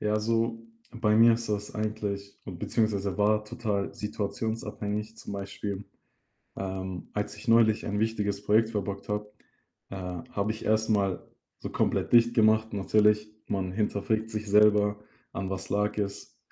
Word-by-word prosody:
Ja, 105 0 +1
also, 115 +2 +1 0.3
bei 115 -3 +1
mir 115 +1 +7
ist 115 0 -4
das 105 -1 -3
eigentlich 105 -2 -3
beziehungsweise 100 +1 -1
war 105 +1 +3
total 105 -3 -2
situationsabhängig. 105 0 -3
Zum 110 - -8
Beispiel, 100 0 -5 0.7
ähm, 95 -1 -5
als 105 0 -3
ich 105 - -11
neulich 115 -1 +4
ein 105 0 -1
wichtiges 105 -2 -1
Projekt 110 +2 +4
verbockt 100 -2 -4
habe, 105 0 -3 0.6
äh, 100 - -6 0.4
habe 105 0 0
ich 110 - -9
erst 110 +1 +2
mal 100 -3 +1 0.3
so - - -6
komplett - - 0
dicht 120 0 +6
gemacht. 110 -1 +4
Natürlich, 105 +1 +3 0.2
man 95 -2 -1
hinterfragt 110 +2 -1
sich 110 -1 -4
selber: 105 0 +5 0.3
„An 95 -1 -4
was 95 - -5
lag 105 +1 +1
es? 100 -1 -4
105 Hz, 145 wpm, -28 LUFS, 100-110 Hz, 0.7 s, mir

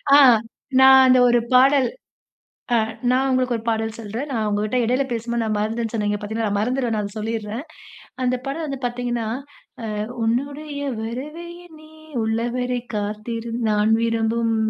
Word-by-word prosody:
ஆ, - - +9 0.6
நான் 265 0 +8
அந்த 255 0 +6
ஒரு 240 0 +4
பாடல் 265 +1 +5 0.9
அ - - +5 0.3
நான் 260 +2 +2
உங்களுக்கு 255 -2 +1
ஒரு 225 - -8
பாடல் 225 0 -1
சொல்றேன். 230 +6 -5
நான் 220 -3 -1
உங்ககிட்ட 210 +3 -1
இடையில 255 +4 +1
பேசும்போது, 235 0 -2
நான் 215 -1 -1
மறந்தேன்ன்னு 225 +2 -2
சொன்னேன். 210 -2 0
இங்க 205 - -1
பாத்தீங்களா, 220 +1 -2
மறந்துருவேன் 245 +2 0
நான் 210 - -1
அத 200 - -15
சொல்லிர்றேன். 225 +3 -4 0.6
அந்த 250 0 +2
படம் 315 +4 -3
வந்து 275 -2 -4
பாத்தீங்கன்னா, 240 -2 -2 0.6
அ - - -3 0.4
"உன்னுடைய 285 +5 -2 0.2
வரவை 285 +9 -6 0.2
எண்ணி 310 -2 -16 0.3
உள்ளவரை 240 +3 -1 0.2
காத்திரு, 215 +3 -4 0.2
நான் 210 +1 +2
விரும்பும் 230 0 +1
235 Hz, 145 wpm, -22 LUFS, 220-255 Hz, 0.9 s, ஆ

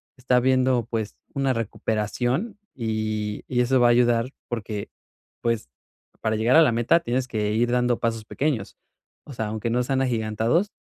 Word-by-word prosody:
está 125 -1 +1
habiendo, 130 -2 +3
pues, 110 -3 -3 0.2
una 135 -1 +1
recuperación 120 - -2 0.2
y 110 -3 -2
y 125 -1 +1
eso 130 +1 +3
va 120 - +5
a - - +5
ayudar 120 0 +3 0.2
porque, 105 -3 -4 0.5
pues, 115 - -1 0.5
para 110 -1 0
llegar 115 +5 +3
a 165 - +9
la 150 - +5
meta 120 +8 +3
tienes 130 -5 -1
que 105 -3 -1
ir 120 +2 +1
dando 125 -1 +2
pasos 115 -1 -2
pequeños. 135 -5 -2 0.5
O 145 - -9
sea, 110 -3 -3
aunque 110 +2 -3
no 125 +2 +1
sean 135 +1 0
agigantados, 115 - 0
120 Hz, 165 wpm, -24 LUFS, 110-130 Hz, 0.5 s, a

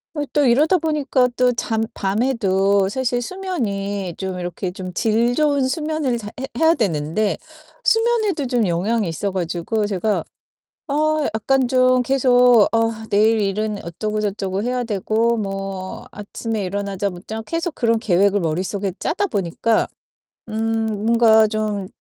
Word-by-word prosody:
어 295 - -1
또 290 -2 +3
이러다 300 +9 +4
보니까 295 -5 +1
또 250 0 +4
잠 225 -1 -1
밤에도 200 -2 +1
사실 245 +1 -1
수면이 205 - -3
좀 190 -1 -4
이렇게 180 +1 -4
좀 185 0 -7
질 225 +5 +1
좋은 285 -3 +2
수면을 300 -3 -1
잘해 210 -2 -8 0.3
해야 325 +1 +5
되는데 190 - 0 0.5
수면에도 450 - +2
좀 240 -5 +1
영향이 200 +5 0
있어 195 +4 -2
가지고 185 +4 -2
제가, 205 +1 -1 0.7
어 310 +1 +1
약간 255 +4 +1
좀 255 0 +3
계속 245 -3 +5
어 225 0 +2 0.2
내일 220 +2 +3
일은 205 +1 -2
어쩌고 210 +6 -3
저쩌고 195 -2 -2
해야 250 +1 -1
되고 225 +2 0
뭐 195 -2 -5
아침에 210 +1 -4
일어나자마자 200 +1 -4
계속 330 0 -2
그런 230 -2 +2
계획을 200 -1 +2
머릿속에 185 +3 -2
짜다 385 +5 0
보니까 210 - 0 0.6
음 225 +1 -1 0.2
뭔가 225 -1 +5
좀 210 -3 -2
220 Hz, 280 characters per minute, -20 LUFS, 195-255 Hz, 0.7 s, 해야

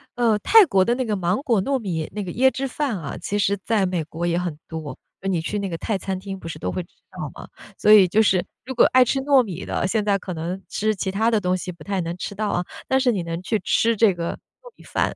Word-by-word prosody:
呃， 230 -3 +2
泰 440 - +7
国 195 - +3
的 235 +5 +1
那 255 0 -1
个 215 -2 -1
芒 180 0 0
果 230 -8 +2
糯 275 +7 0
米 175 -9 -3
那 210 - -2
个 180 - -5
椰 260 +6 +4
汁 270 +1 -3
饭 265 -4 -2
啊， 155 -5 -6
其 205 +4 -2
实 200 0 +2
在 220 -4 +1
美 180 -3 -1
国 165 +2 -4
也 170 0 +1
很 175 -4 -3
多。 155 -5 -6 0.2
呃 195 - -2
你 180 -3 +1
去 190 +6 -3
那 200 -1 -3
个 165 - -4
泰 200 +2 -2
餐 190 0 -3
厅 195 0 -7
不 165 - -9
是 155 - -6
都 - - -3
会 185 - -3
吃 175 - -14 0.2
到 - - -6
嘛， - - -10 0.3
所 210 - +5
以 200 -3 +8
就 215 +5 +3
是 190 -4 +3 0.2
如 260 - -5
果 250 - +5
爱 255 0 +6
吃 270 +3 0
糯 270 -1 +4
米 185 -4 -6
的， - - -1
现 215 +2 0
在 205 -1 +2
可 185 -1 -6
能 170 +3 -4
吃 215 +1 -1
其 190 0 -2
他 220 +4 +2
的 225 -2 +2
东 180 -2 0
西 185 0 -5
不 170 - -13
太 195 -2 -2
能 170 +1 -4
吃 190 - -5
到 210 +1 -2
啊， 175 -2 -1 0.2
但 265 0 +3
是 260 -2 +3
你 200 -5 -1
能 165 0 -4
去 215 +3 0
吃 230 0 +2
这 215 -3 +4
个 170 -1 -3
糯 - - -17
米 - - -18
饭。 - - -1
195 Hz, 305 characters per minute, -23 LUFS, 175-225 Hz, 0.3 s, 以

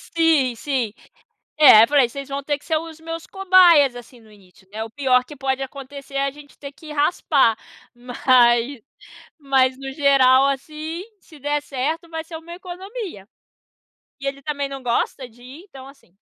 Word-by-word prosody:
Sim. 305 -7 +2
Sim. 245 -5 -3 0.6
É, 255 -8 +8
eu - - -4
falei: 280 -4 +3
"Vocês 275 +2 -8
vão 275 0 -4
ter 290 +1 -2
que - - -24
ser 320 - 0
os 325 0 -6
meus 330 0 -7
cobaias, 360 -8 +5
assim, 245 0 -12
no 220 -2 -20
início", 190 -1 -22
né. 220 +1 -5
O 225 - -7
pior 255 -2 +1
que 295 +2 -12
pode 265 0 -2
acontecer, 275 +1 -9
é 275 0 0
a - - -1
gente 290 -1 -17
ter 280 -1 -9
que 305 +1 -12
raspar. 290 -6 +2 0.4
Mas 245 0 +2 0.6
mas, 265 -2 +1
no 270 0 -7
geral, 275 -2 +4
assim, 310 +5 -4 0.2
se 310 - -17
der 290 +1 -2
certo, 300 +5 -4
vai 320 0 -5
ser 325 0 -9
uma 335 +2 -10
economia. 370 - -8 0.9
E 275 - -8
ele 275 0 -4
também 285 -1 -3
não 275 -1 -8
gosta 245 +1 -2
de 245 +2 -20
ir. 275 +8 -12
Então, 265 -2 -12
assim 275 -10 -19
275 Hz, 180 wpm, -21 LUFS, 255-310 Hz, 0.9 s, É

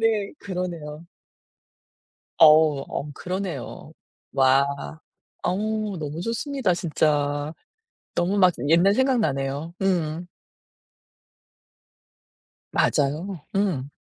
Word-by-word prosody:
네. 220 -3 +1
그러네요. 170 -4 -5 1.3
어우 155 -3 +6
어 150 - -4
그러네요. 180 -5 -5 0.4
와. 135 0 +4 0.8
어우 215 +1 -1
너무 150 +1 -5
좋습니다 230 0 -1
진짜. 150 -3 0 0.6
너무 185 +4 +1
막 185 -2 +6 0.2
옛날 175 +5 +5
생각 260 0 +2
나네요. 140 -1 -2
음. 175 -3 0 2.5
맞아요. 155 +6 0 0.2
음. 170 -10 0
170 Hz, 160 characters per minute, -24 LUFS, 150-195 Hz, 2.5 s, 어우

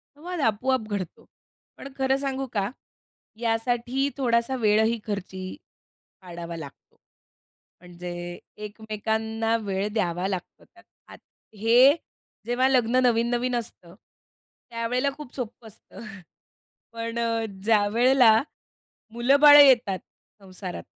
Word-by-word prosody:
संवाद 350 +3 -7
आपोआप 225 0 0
घडतो. 195 -4 -5 0.5
पण - - -9
खरं 265 0 +1
सांगू 270 -1 -3
का? 200 -1 -1 0.7
यासाठी 240 +4 -1
थोडासा 240 0 +1
वेळही 220 0 +2
खर्ची 190 -2 -5 0.8
पाडावा 170 -2 -8
लागतो. 140 -3 -12 0.9
म्हणजे 175 0 -8 0.3
एकमेकांना 220 +1 -2
वेळ 195 0 -2
द्यावा 180 -3 -1
लागतो. 185 -3 -6
तर 350 - -22 0.3
आत - - -13 0.4
हे 245 +7 +6 0.5
जेव्हा 245 +2 +1
लग्न 250 -2 +2
नवीन-नवीन 240 +1 +1
असतं, 180 -7 -7 0.8
त्यावेळेला 240 +4 -1
खूप 295 -5 -10
सोपं 235 -2 -7
असतं. 220 +1 -14 0.9
पण 230 0 -5
अ, 230 -1 0 0.2
ज्यावेळेला 225 +3 +4 0.8
मुलं-बाळं 280 +5 +7
येतात 240 -9 +5 0.4
संसारात, 185 -1 -8
230 Hz, 100 wpm, -25 LUFS, 205-255 Hz, 0.9 s, मुलं-बाळं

